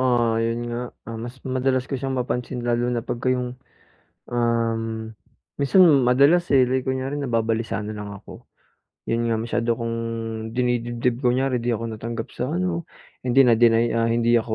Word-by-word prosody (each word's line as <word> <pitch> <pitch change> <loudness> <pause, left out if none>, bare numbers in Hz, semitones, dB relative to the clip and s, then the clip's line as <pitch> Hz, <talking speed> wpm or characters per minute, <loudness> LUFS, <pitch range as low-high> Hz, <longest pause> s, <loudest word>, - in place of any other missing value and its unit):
ah, 120 -3 +2
'yon 115 +1 0
nga. 120 - -3 0.3
Ah, 115 -1 -6
mas 120 +2 -7
madalas 130 0 0
ko 135 - -11
siyang 135 0 -3
mapansin 125 0 -2
lalo 120 0 +1
na 120 -2 -1
pagka 120 +2 -2
yung, 125 0 -1 0.7
um, 115 -1 0 0.7
minsan 175 +7 +5 0.2
madalas, 140 +8 +4
eh, 130 -2 +6
like 130 0 0
kunyari 130 +2 -2
nababalisa 115 -6 -1
na 110 - -5
lang 105 -1 -6
ako. 100 - -11 0.6
'Yon 115 0 0
nga 110 - +2
masyado 115 0 -1
kong 115 0 -2 0.6
dinidibdib 120 0 0
kunyari 125 0 +1
di 120 - 0
ako 115 0 -2
natanggap 115 +1 -5
sa 125 +3 -2
ano, 175 -2 -2 0.3
hindi 130 +2 +5
na-deny 115 0 +4
ah, 115 0 +2
hindi 120 0 +2
ako 110 -1 +1
120 Hz, 160 wpm, -23 LUFS, 115-130 Hz, 0.7 s, eh